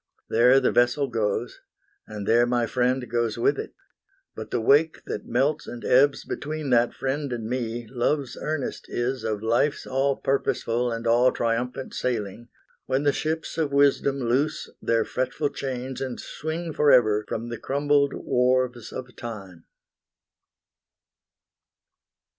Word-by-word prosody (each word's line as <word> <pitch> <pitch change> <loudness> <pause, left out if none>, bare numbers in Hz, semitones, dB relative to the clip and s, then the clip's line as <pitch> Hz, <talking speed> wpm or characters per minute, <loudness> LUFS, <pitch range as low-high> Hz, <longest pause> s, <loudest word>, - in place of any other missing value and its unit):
There 125 +4 +6
the 130 - +2
vessel 120 +4 +3
goes, 115 -4 -2 0.5
And 105 -1 -6
there 120 +1 +4
my 120 -1 +1
friend 125 +1 0
goes 120 -1 -1
with 115 - +2
it; - - -6 0.6
but - - -7
the - - -1
wake 145 +7 +3
That - - -5
melts 135 +5 0
and 120 - -7
ebbs 135 +2 +4
between 150 -2 -4
that 120 0 +3
friend 135 +1 -2
and 115 -2 -4
me 120 -1 -3
Love's 130 +3 -1
earnest 155 -3 -4
is 125 +2 -2
of 110 -1 -2
Life's 120 +6 +1
all 135 +1 +1
purposeful 125 -3 0
And 115 0 -4
all 120 +2 +4
triumphant 125 +3 -2
sailing, 120 -1 -3 0.4
when 135 +2 +1
the 145 -1 +3
ships 160 +2 -3
Of 150 -3 0
Wisdom 140 0 +3
loose 135 +5 -1
their 115 -1 +1
fretful 130 +3 -1
chains 130 -1 -5
and 130 -2 -4
swing 160 +1 -5
Forever 125 -8 +4
from 115 +1 -4
the 120 - -5
crumbled 140 0 +1
wharves 125 -2 0
of 125 -2 -8
Time. 100 -7 -8
125 Hz, 140 wpm, -25 LUFS, 120-140 Hz, 0.6 s, There